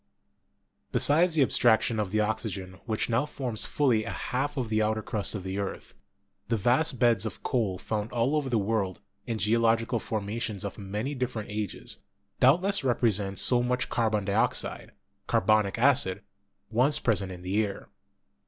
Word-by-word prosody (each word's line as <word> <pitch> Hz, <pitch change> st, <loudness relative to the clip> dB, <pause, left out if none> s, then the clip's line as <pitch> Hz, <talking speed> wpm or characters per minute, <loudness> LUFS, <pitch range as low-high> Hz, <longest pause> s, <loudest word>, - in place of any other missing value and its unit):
Besides 165 Hz, +3 st, +3 dB
the 150 Hz, -, +5 dB
abstrac 115 Hz, -3 st, +4 dB
tion 115 Hz, -2 st, -1 dB
of 105 Hz, -3 st, -1 dB
the 110 Hz, +2 st, +1 dB
oxygen 100 Hz, -4 st, -3 dB
which 110 Hz, -1 st, -1 dB
now 120 Hz, +5 st, +1 dB
forms 125 Hz, -6 st, -2 dB
fully 125 Hz, -7 st, +2 dB
a 115 Hz, -, -5 dB
half 145 Hz, +4 st, -3 dB
of 125 Hz, -4 st, -2 dB
the 110 Hz, 0 st, +1 dB
outer 110 Hz, 0 st, 0 dB
crust 110 Hz, -2 st, -2 dB
of 100 Hz, -, -5 dB
the 95 Hz, +1 st, -3 dB
earth, 100 Hz, -, -5 dB, 0.5 s
the 115 Hz, -, 0 dB
vast 125 Hz, +7 st, +2 dB
beds 115 Hz, -4 st, +3 dB
of 110 Hz, -4 st, -6 dB
coal 105 Hz, -7 st, 0 dB
found 105 Hz, +3 st, -3 dB
all 120 Hz, +5 st, +1 dB
over 145 Hz, -3 st, -1 dB
the 120 Hz, -, +1 dB
world, 100 Hz, -3 st, -1 dB, 0.3 s
in 115 Hz, -2 st, -2 dB
geological 115 Hz, +2 st, +2 dB
formations 110 Hz, 0 st, -4 dB
of 100 Hz, -, -6 dB
many 105 Hz, +8 st, -3 dB
differ 125 Hz, -4 st, -3 dB
ent 105 Hz, -, -10 dB
ages, 105 Hz, -2 st, -4 dB, 0.4 s
doubtless 180 Hz, +9 st, +4 dB
represent 105 Hz, -6 st, +1 dB
so 125 Hz, -1 st, +3 dB
much 125 Hz, +1 st, -1 dB
carbon 110 Hz, -4 st, 0 dB
dioxide 100 Hz, -, -1 dB, 0.3 s
(car 115 Hz, -, +3 dB
bonic 110 Hz, -2 st, +2 dB
acid) 120 Hz, -8 st, +3 dB, 0.5 s
once 130 Hz, +6 st, +4 dB
present 100 Hz, -5 st, 0 dB
in 90 Hz, -1 st, -9 dB
the 100 Hz, +4 st, +1 dB
air. 100 Hz, -2 st, -6 dB
110 Hz, 170 wpm, -28 LUFS, 105-125 Hz, 0.5 s, the